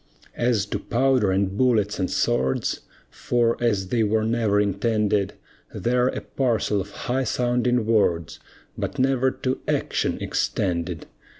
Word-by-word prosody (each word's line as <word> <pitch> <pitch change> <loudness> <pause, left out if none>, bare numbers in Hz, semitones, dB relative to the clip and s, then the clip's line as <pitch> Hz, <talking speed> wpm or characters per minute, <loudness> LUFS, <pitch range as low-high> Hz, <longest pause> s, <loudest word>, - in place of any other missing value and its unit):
As 120 -5 +1
to 100 - -3
powder 125 -3 +2
and 95 0 0
bullets 110 -5 +2
and 95 - 0
swords, 65 +1 0 0.3
For, 120 -1 +1
as 100 -5 +1
they 120 +1 +1
were 110 0 +2
never 110 -2 +1
intended, 105 0 +1 0.4
They're 125 +1 +1
a - - -2
parcel 115 -6 0
of 100 - -8 0.2
high 130 +2 0
sounding 125 0 +1
words, 90 -8 +1 0.4
But - - -4
never 130 0 +2
to 130 0 -3
action - - 0
extended. 85 -3 -2
110 Hz, 130 wpm, -24 LUFS, 100-125 Hz, 0.4 s, powder